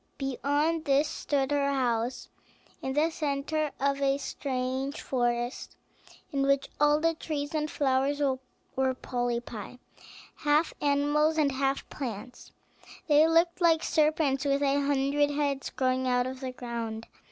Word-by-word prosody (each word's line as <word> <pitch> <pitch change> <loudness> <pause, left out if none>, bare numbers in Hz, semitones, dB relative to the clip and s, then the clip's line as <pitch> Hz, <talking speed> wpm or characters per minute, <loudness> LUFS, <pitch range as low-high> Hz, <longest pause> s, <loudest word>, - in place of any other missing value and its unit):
Beyond 290 +4 0
this 285 +1 +3
stood 285 -3 -1
her 280 -1 +2
house, 245 -2 -1 0.5
in 265 - -3
the 310 +4 +2
centre 300 0 -1
of 280 0 0
a 275 0 +2
strange 265 0 -3
forest, 240 -1 -2 0.6
in 280 -2 0
which 275 0 +2
all 295 0 +4
the 330 +1 +2
trees 295 -2 -4
and 305 -1 -1
flowers 275 0 +1
were 265 -1 -2
polypi, 240 -2 -4 0.6
half 300 +2 +2
animals 295 +2 +2
and 295 -3 +3
half 270 +1 -1
plants; 245 -1 -7 0.6
they 305 +1 +6
looked 340 +2 +2
like 330 -2 +4
serpents 300 -3 +2
with 280 0 +1
a 280 0 +2
hundred 285 +1 +2
heads 285 -2 -1
growing 260 0 0
out 250 0 +2
of 260 0 -5
the 260 -1 -4
ground. 230 -3 -5
275 Hz, 135 wpm, -28 LUFS, 260-295 Hz, 0.6 s, they